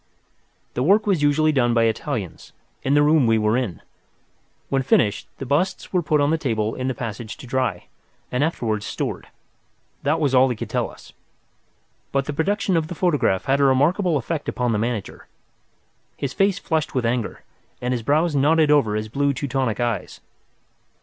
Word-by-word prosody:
The 125 - -2
work 200 +9 +4
was 190 -7 +1
usually 150 +2 +3
done 120 -5 +2
by 115 - +4
Italians, 110 - -3 0.3
in 135 +2 +1
the 145 - +5
room 150 -4 +4
we 115 0 +4
were 105 +1 +2
in. 120 -9 -3 0.9
When 135 -1 +1
finished, 105 -5 +1
the 135 - -6
busts 175 +11 -1
were 180 - +3
put 155 -2 +1
on 145 +2 +2
a 165 - 0
table 110 -7 -1
in 130 - -3
the 130 - -1
passage 115 -1 -6
to - - -11
dry, 125 -7 -1 0.5
and 125 +3 +1
afterwards 110 -10 -1
stored. - - -4 0.7
That 150 +3 +1
was 145 -4 +1
all 130 0 +5
he 125 - -1
could - - -7
tell - - 0
us. - - -15 1.0
But 135 0 0
the 150 - -4
production 190 +4 0
of 160 -1 +1
the 175 - -6
photograph 145 - +1
had 135 +1 +2
a - - +3
remarkable 150 +6 +3
effect 150 +3 -3
upon 125 -2 -1
the 105 - 0
manager. 115 -2 -4 0.9
His 140 -1 -3
face 195 -2 +2
flushed 160 -7 -2
with 125 -2 0
anger, 115 -1 -2 0.4
and 125 - -2
his 120 - -2
brows 150 +6 +1
knotted 150 +2 +4
over 120 -8 +3
his 110 0 -2
blue 140 +5 0
Teutonic 130 -4 -2
eyes. 120 -5 -2
135 Hz, 185 wpm, -22 LUFS, 115-155 Hz, 1.0 s, the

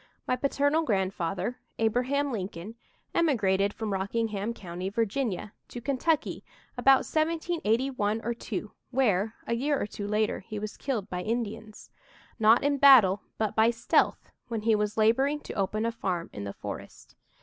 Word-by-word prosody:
My 255 - +2
paternal 285 +4 +1
grandfather, 195 - -1 0.2
Abraham 255 +6 +1
Lincoln, 195 -2 -5 0.4
emigrated 200 - +2
from 215 -1 -4
Rockingham 205 +2 -1
County, 185 -4 -5
Virginia, 215 -1 -2
to 245 - -7
Kentucky 280 +5 0 0.3
about 265 +1 +5
1781 270 -9 0
or 235 - -1
2, 210 -3 -5 0.2
where, 220 -5 +1
a - - -1
year 280 +4 0
or - - -1
two 205 0 -6
later, 210 +1 0
he 215 +2 -8
was 210 +1 -5
killed 230 -8 -3
by 180 -3 -4
Indians 220 0 -4 0.5
not 225 +3 +5
in 285 0 +1
battle, 225 -9 +7 0.2
but 215 -2 -1
by 220 +1 +5
stealth, 235 0 +1 0.2
when 225 -3 -3
he 225 0 +3
was 210 0 0
laboring 265 +7 +3
to - - -8
open 210 +3 -1
a 230 - +1
farm 180 -6 -3
in 100 - -6
the 100 - -5
forest. - - -9
225 Hz, 150 wpm, -28 LUFS, 205-260 Hz, 0.5 s, battle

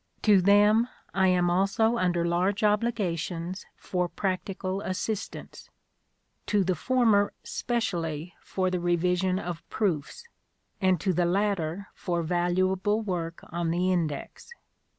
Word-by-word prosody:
To 205 -3 +6
them 210 +5 +5 0.2
I 190 -1 +3
am 180 -1 +3
also 200 +5 +2
under 175 -2 +1
large 185 +6 +1
obligations 190 -5 -1
for 180 -1 -2
practical 190 0 -3
assistance; 205 +3 -5 0.8
to 205 -2 +2
the 185 0 +1
former 220 +1 +2
specially 175 -9 -2
for 185 -1 -1
the 180 - 0
revision 180 +2 +1
of 175 -3 -4
proofs, 185 - -2 0.6
and 185 -2 +3
to 190 -2 +1
the 175 +1 +2
latter 195 -1 -1
for 175 -2 -2
valuable 185 +4 +1
work 175 -5 -4
on 170 -1 -1
the 180 +2 +1
Index. 160 -5 -3
185 Hz, 120 wpm, -27 LUFS, 175-205 Hz, 0.8 s, To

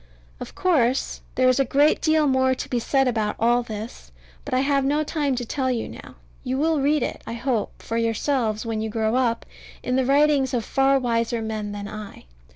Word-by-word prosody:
Of - - -8
course, 270 -8 +1
there 255 0 +3
is 255 +1 +3
a - - +5
great 285 +4 +3
deal 315 -1 +3
more 260 -1 +2
to - - -6
be 245 - -1
said 270 +3 +1
about 220 -4 0
all 240 +2 +3
this: 220 0 -8 0.3
but 290 - -8
I 255 - +3
have 275 0 +2
no 295 +3 +1
time 290 -3 -1
to 245 -1 -3
tell 260 +2 -1
you 240 -3 -1
now. - - -11 0.3
You 260 0 -2
will 310 0 +1
read 295 +2 +2
it, - - -4
I - - -4
hope, 235 -2 -2
for 230 - -3
yourselves 230 -1 0
when 225 -1 -2
you 220 - -2
grow 220 +1 0
up, 240 -3 0 0.4
in 250 +1 0
the 265 - +2
writings 280 -2 +3
of 230 -3 -1
far 270 0 +3
wiser 235 -2 0
men 215 -2 -4
than 205 0 -6
I. 215 - -9
255 Hz, 210 wpm, -23 LUFS, 230-275 Hz, 0.4 s, a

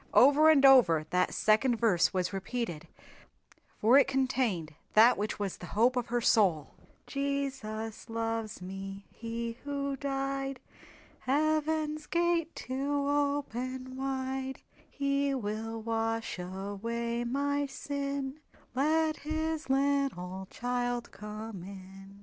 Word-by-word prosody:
Over 290 +4 +7
and 285 -3 +6
over 200 - +7
that 180 0 +2
second 220 +4 +3
verse 215 -7 +3
was 185 0 -1
repeated 195 -4 -4 0.9
for 240 +6 +6
it - - +4
contained 250 -12 0 0.2
that 230 +3 +8
which 210 +1 -2
was 200 -3 -3
the 180 - -9
Hope 245 +3 +4
of 245 -1 -1
her 240 +1 0
soul: 185 -10 +3 0.3
"Jesus 270 -6 -3
loves 225 -3 -3
me, 195 +1 -7
He 230 +1 -5
who 280 -1 -2
died, 275 -1 -2 0.6
Heaven's 310 +2 0
gate 340 -1 +1
to 280 +2 -1
open 260 -3 -1
wide, 265 0 -3 0.3
He 280 0 0
will 225 -1 -3
wash 225 -2 -2
away 205 +6 -3
my 285 +3 0
sin, 280 0 -4 0.3
Let 310 +4 +2
His 315 0 -3
little 270 -10 0
child 245 0 -2
come 210 -2 -7
in!" 195 +1 -11
250 Hz, 115 wpm, -30 LUFS, 215-280 Hz, 0.9 s, that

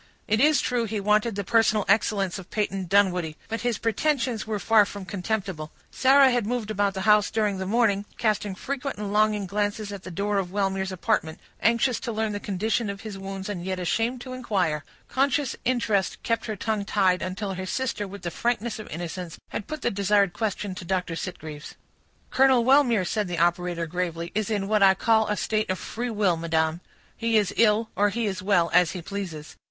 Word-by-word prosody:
It 215 +1 +2
is 300 +1 +5
true, 245 -2 0
he 215 -1 -3
wanted 210 +2 +2
the 200 - -2
personal 220 0 +3
excellence 200 -2 +1
of 185 - -11
Peyton 195 -3 -2
Dunwoodie, 180 -5 +2
but 225 +1 -3
his 240 -2 0
pretensions 235 -1 0
were 215 -1 -1
far 220 +1 +5
from 200 -1 -7
contemptible. 190 -5 -3 0.2
Sarah 270 0 +5
had 240 -4 0
moved 230 -3 -2
about 200 -1 0
the 190 - -3
house 210 +1 +4
during 210 -3 0
the 190 - -3
morning, 205 -2 +2
casting 210 -3 0
frequent 275 +5 -4
and 205 -1 -4
longing 210 -1 +2
glances 205 +2 -2
at 200 -2 -7
the 185 - -9
door 200 +3 -1
of 180 -2 -4
Wellmere's 195 -1 -1
apartment, 185 -4 -1 0.2
anxious 235 +2 +2
to 240 - -4
learn 220 -1 -1
the 205 - -3
condition 210 +3 -1
of 200 0 -6
his 215 -3 -7
wounds, 195 0 -6
and 195 -4 -4
yet 185 0 -3
ashamed 230 +7 -1
to 255 0 -7
inquire; 190 - -1 0.2
conscious 275 0 +1
interest 220 -6 +1
kept 230 0 -1
her 215 - -3
tongue 215 0 -2
tied, 190 -3 +2
until 190 +2 -3
her 185 0 -5
sister, 235 -3 -2
with 200 +1 -10
the 170 - -3
frankness 235 +2 -1
of 215 - -8
innocence, 175 +1 -6
had 205 - -5
put 310 -1 -6
the - - +1
desired 200 -1 +2
question 205 -3 -2
to 185 - -8
Dr. 180 -1 -2
Sitgreaves. 155 -4 -7 0.6
"Colonel 260 -2 +4
Wellmere," 250 -7 +4
said 210 +3 -1
the 175 -1 -3
operator, 175 0 +1
gravely, 170 0 -3
"is 215 0 -1
in 205 -3 -1
what 215 0 +2
I 190 -1 +7
call 220 +2 +3
a 210 0 -1
state 215 -2 -1
of 185 - 0
free 245 +6 -4
will, 205 -6 +1
madam. 160 0 0 0.3
He 230 -1 +1
is 205 -3 +1
ill, 220 0 +3
or 205 +1 +3
he 230 +3 -2
is 190 -3 -2
well, 180 -4 +2
as 180 -1 +4
he 180 -3 -6
pleases. 175 -6 -6
205 Hz, 200 wpm, -25 LUFS, 185-225 Hz, 0.6 s, I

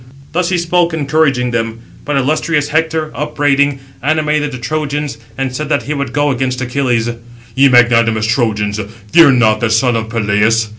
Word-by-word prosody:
Thus 175 +1 0
he 185 - +1
spoke, 170 0 +1
encouraging 140 -4 +1
them; 115 -1 -2 0.3
but 145 -1 -1
illustrious 150 +2 0
Hector, 160 0 -1
upbraiding, 145 -1 0 0.2
animated 150 0 0
the 130 - -6
Trojans, 145 -1 -3 0.2
and 130 -1 -3
said 150 +2 -4
that 145 - 0
he 150 - -3
would 140 -4 -3
go 145 +1 +1
against 130 -1 -2
Achilles: 125 -2 -1 0.5
"Ye 135 +1 +5
magnanimous 115 -3 +3
Trojans, 110 -3 0 0.3
fear 165 -3 +7
not 110 -4 +3
the 115 - 0
son 115 +2 +2
of 110 -1 -3
Peleus. 110 0 +1
135 Hz, 160 wpm, -14 LUFS, 115-150 Hz, 0.5 s, fear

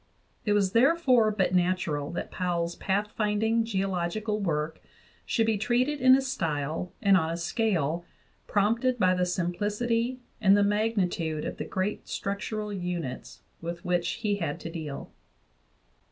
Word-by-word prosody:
It 210 - +3
was 200 -2 +2
therefore 255 - +4
but 195 -3 0
natural 175 -5 +1
that - - -4
Powell's 170 -2 -1
pathfinding 210 +3 0
geological 195 +1 -1
work 160 -4 -2 0.5
should 225 - +2
be 220 -2 +1
treated 250 +6 +1
in 255 0 +8
a 270 - +2
style 160 - -2
and 200 -1 +6
on 160 -4 +2
a 165 - -2
scale 170 - 0 0.4
prompted 230 +5 +2
by 185 -4 +4
the 180 0 +1
simplicity 210 +8 -1 0.2
and 200 -1 +6
the 205 - +4
magnitude 195 -7 0
of - - -4
the - - -4
great 190 +2 -2
structural 210 +1 -3
units 170 - -5 0.2
with 170 0 -6
which 175 -1 +1
he 205 -1 +1
had 165 -6 -3
to 165 - -6
deal. 155 -4 -6
195 Hz, 140 wpm, -28 LUFS, 170-220 Hz, 0.5 s, in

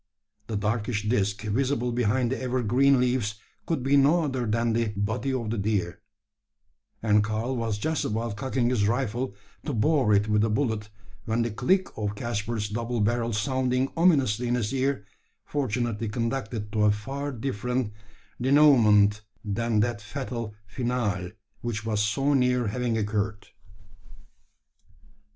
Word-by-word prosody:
The 110 -3 -2
darkish 105 +1 -1
disc 105 -3 0
visible 125 +3 0
behind 120 +1 +1
the 130 - -2
evergreen 130 +2 +3
leaves 125 -4 0 0.3
could 160 -7 -1
be 140 +2 +4
no 150 +5 +4
other 130 -5 -2
than 115 +1 +1
the 115 0 +1
body 110 +6 -1
of 120 -4 -2
the 115 - -2
deer; 100 -2 -1 1.0
and 105 -1 +4
Karl 110 +4 -2
was 115 -3 -1
just 155 +8 -1
about 110 0 -2
cocking 125 +1 0
his 105 -5 +2
rifle, 120 -1 -1 0.3
to 150 - -3
bore 125 +1 +2
it 100 +1 +2
with 105 0 +2
a 115 - +2
bullet, 110 -3 -1 0.4
when 115 0 +1
the 115 - -2
click 185 - +1
of 105 -1 -3
Caspar's 110 -1 -2
double 115 +3 -3
barrel 115 +2 +1
sounding 130 +4 0
ominously 135 - +3
in 120 - +1
his 115 -2 -1
ear, 135 -5 0 0.4
fortunately 120 -5 -2
conducted 115 -2 -3
to 105 0 +2
a 105 - +5
far 135 +7 -4
different 125 -2 -2 0.5
denouement 115 -7 +5 0.2
than 110 +1 +1
that 115 -2 -1
fatal 115 -2 -5
finale 105 -5 -2 0.3
which 110 -2 -3
was 105 -2 0
so 135 +8 +1
near 125 -2 +2
having 120 +1 -1
occurred. 105 0 -2
115 Hz, 145 wpm, -26 LUFS, 105-130 Hz, 1.0 s, a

